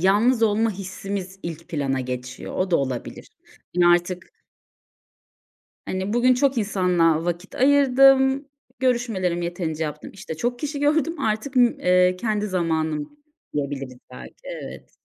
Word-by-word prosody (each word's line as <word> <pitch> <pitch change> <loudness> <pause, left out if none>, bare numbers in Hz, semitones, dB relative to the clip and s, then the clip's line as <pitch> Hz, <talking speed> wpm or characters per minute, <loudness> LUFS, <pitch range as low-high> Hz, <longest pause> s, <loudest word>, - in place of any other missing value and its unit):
yalnız 220 +6 +3
olma 220 +1 +3
hissimiz 195 0 -6
ilk 165 -1 -7
plana 135 -4 -1
geçiyor. 125 0 -6
O 185 0 -1
da 170 - +4
olabilir. 130 -3 -4 0.5
Hani 175 - +5
artık 175 - +1 1.5
hani 190 +2 -3
bugün 250 +2 +4
çok 270 0 +1
insanla 180 -6 +2
vakit 175 +2 -4
ayırdım. 270 0 +4 0.3
Görüşmelerimi 225 -9 0
yeterince 165 -2 -3
yaptım. 150 - -6
İşte 185 -4 -7
çok 240 +7 -2
kişi 290 +1 -4
gördüm. 305 +3 +1
Artık, 220 +5 -2
ımm, 245 -1 +4
eee, 180 0 +4
kendi 210 +1 -1
zamanım 160 - -2 0.4
diyebiliriz 135 -3 -4
belki. - - -10
Evet. - - -8
190 Hz, 130 wpm, -23 LUFS, 165-245 Hz, 1.5 s, Hani